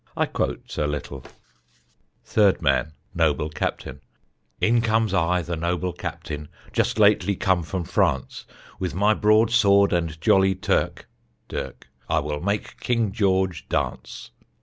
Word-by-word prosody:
I - - +2
quote - - -4
a 75 - +1
little: 70 -2 -5 1.0
Third 105 -3 +3
Man 75 +1 +1 0.2
Noble 75 +1 +1
Captain: 70 -1 -4 0.6
In 115 +1 +3
comes 110 -3 +1
I, 90 -1 +1
the 85 +1 -4
Noble 90 +2 -2
Captain, 75 0 -6 0.2
Just - - 0
lately 100 -2 +4
come 95 -1 +1
from 85 +3 -4
France; 65 -5 -1 0.3
With 90 -3 -3
my 105 +3 +3
broad 110 +1 +3
sword 100 -4 +4
and 85 -2 -1
jolly 95 +3 +3
Turk 95 +1 -1 0.4
[dirk] 65 - -6 0.2
I - - +2
will 75 0 -2
make 100 +3 -3
King 115 -4 0
George 95 -5 0
dance. - - -3
95 Hz, 135 wpm, -24 LUFS, 80-105 Hz, 1.0 s, lately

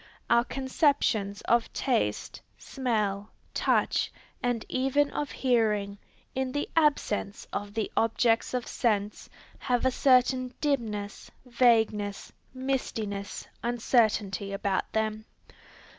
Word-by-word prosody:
Our 235 0 +5
conceptions 260 -7 0
of 235 -1 +1
taste, 105 - -1 0.2
smell, 215 -6 -2 0.2
touch, - - +1 0.3
and 245 -2 -1
even 270 +2 +1
of 295 - -3
hearing, 210 -5 +1 0.3
in 260 -1 -1
the 290 - -1
absence 280 -10 +1
of 205 +1 -4
the 220 -2 -2
objects 225 +2 +2
of 250 - -2
sense, 210 -4 -1 0.3
have 250 -2 0
a 260 - +4
certain 255 -1 +3
dimness, 220 -8 -2 0.2
vagueness, 220 -5 +2 0.2
mistiness, 230 -6 -3
uncertainty 220 -4 +1
about 195 -1 -1
them. 215 0 -1
230 Hz, 100 wpm, -28 LUFS, 205-255 Hz, 0.3 s, Our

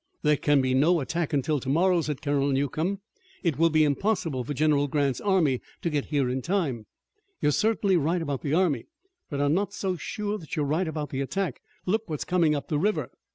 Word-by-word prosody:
"There 150 0 +4
can 145 -1 +3
be 130 0 +1
no 160 +6 +4
attack 160 +3 -2
until 145 +1 +1
tomorrow," 170 +7 +2
said 150 -3 -4
Colonel 145 -1 +1
Newcomb. 155 +8 -1 0.4
"It 160 -6 0
will 165 0 +5
be 155 -1 +4
impossible 155 - 0
for 135 - -6
General 145 0 +2
Grant's 140 -2 0
army 175 -11 +2 0.2
to 170 - 0
get 145 -2 0
here 145 -4 0
in 130 +1 -1
time." 145 - -1 0.5
"You - - +2
are - - +3
certainly 210 0 +2
right 165 +3 +1
about 140 -4 -3
the 145 +1 0
army, 165 -10 +1 0.4
but 140 - -3
I'm 145 +1 +2
not 200 +3 0
so 190 -3 -2
sure 210 +5 -3
that 160 - -7
you're 150 - 0
right 160 +5 0
about 155 -2 -4
the 135 - -2
attack. 170 +1 -2 0.2
Look 220 +2 0
what's 155 -2 -3
coming 170 -4 +2
up 145 - -4
the 150 - 0
river." 210 +6 0
155 Hz, 210 wpm, -27 LUFS, 140-180 Hz, 0.5 s, will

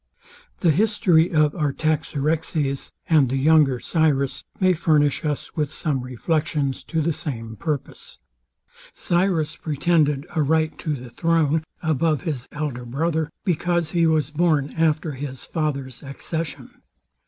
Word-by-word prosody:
The 170 - +5
history 180 -2 +3
of 155 -3 +3
Artaxerxes, 150 -1 -1 0.2
and 150 -6 +4
the 135 - 0
younger 145 -2 +4
Cyrus, 145 -4 +1 0.2
may 185 -1 +4
furnish 150 -4 +2
us 150 -2 -3
with 150 -2 -1
some 145 -4 -1
reflections 145 +2 -1
to 160 -1 -1
the 165 +1 +1
same 115 -7 -5
purpose. 150 - -5 0.8
Cyrus 175 -3 +1
pretended 150 -2 +1
a 155 - +2
right 155 +2 +1
to 155 -2 -2
the 125 -2 -9
throne 160 -1 +1 0.2
above 155 0 +1
his 145 -8 -3
elder 145 -5 -4
brother, 155 +5 -1 0.2
because 175 -2 0
he 170 -1 +3
was 155 -3 +1
born 150 -3 +1
after 160 -1 +1
his 135 -2 -6
father's 140 -6 -3
accession. 155 +3 -6
155 Hz, 130 wpm, -23 LUFS, 140-165 Hz, 0.8 s, The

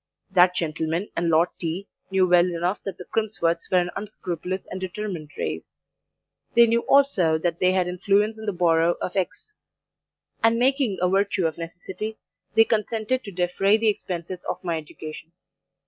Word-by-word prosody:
That 180 -1 +5
gentleman 160 +3 -2
and 170 0 0
Lord 165 +2 +4
T. 175 +4 -3 0.2
knew 190 -1 +3
well 175 0 +5
enough 175 +3 -1
that 195 - -4
the 180 - -9
Crimsworths 175 -7 -1
were 185 - +3
an 175 0 +1
unscrupulous 185 -3 -4
and 185 - -7
determined 185 -4 -5
race; - - -4 0.8
they 235 0 +8
knew 230 0 +2
also 200 - +4
that 170 +1 -2
they 185 0 +3
had 185 -1 +1
influence 200 +4 +1
in 220 - -8
the - - +2
borough 170 -2 +3
of 180 - -4
X; 195 - -3 0.9
and, 225 0 +4
making 255 -4 +2
a 180 - +4
virtue 195 0 +1
of 160 0 -2
necessity, 190 +6 -6 0.4
they 225 - +7
consented 225 +3 -1
to 200 - -7
defray 185 +3 +2
the 225 0 +3
expenses 180 -3 -4
of - - -4
my 170 -2 -1
education. 155 +1 -10
185 Hz, 165 wpm, -24 LUFS, 170-210 Hz, 0.9 s, they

